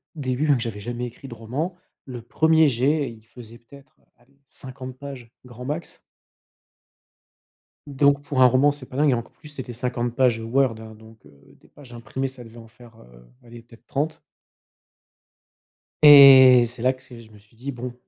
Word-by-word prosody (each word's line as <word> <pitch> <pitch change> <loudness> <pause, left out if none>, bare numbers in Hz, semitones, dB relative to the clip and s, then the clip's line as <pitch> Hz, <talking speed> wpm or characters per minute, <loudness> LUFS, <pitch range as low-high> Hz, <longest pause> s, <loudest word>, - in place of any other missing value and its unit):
début, 130 0 -3
donc 140 -4 +2
j'avais 115 -3 -6
jamais 120 +3 -6
écrit 120 +3 -13
de 125 - -10
roman, 135 +11 -5 0.3
le 125 -3 -9
1er 160 +6 +2
jet, 135 +3 -1
il 110 -1 -17
faisait 115 0 -15
peut-être, 135 +3 -19 0.2
allez, 135 +3 -31
50 130 -1 -11
pages, 130 -4 -11
grand 125 0 -11
max. 150 +5 -7 1.9
Donc 140 0 +1
pour 145 -2 -2
un - - +7
roman 130 +4 +3
c'est 145 -2 -11
pas - - -13
dingue 145 +1 +2
et - - +2
enc 115 0 -6
plus 150 - -17
c'était 130 -4 -9
50 120 0 -4
pages 125 -4 +1
Word, 120 +2 0
hein, 110 0 -12
donc, 110 +1 -18
heu, 70 -1 -22
des - - -24
pages 130 -5 -17
imprimées, 135 +3 -5
ça 130 -2 -11
devait 115 +1 -15
en 115 -1 -13
faire, 120 0 -19
heu, - - -19 0.2
allez, 120 0 -14
peut-être 115 0 -21
30. 155 +4 -4 1.8
Et 135 -4 +8
c'est 120 0 -10
là 130 +1 +1
que 130 - -20
c'est 120 -3 -14
je 110 -1 -19
me 105 - -17
suis 105 +2 -25
dit, 135 +5 -7
bon, 125 0 -8
125 Hz, 185 wpm, -22 LUFS, 115-140 Hz, 1.9 s, Et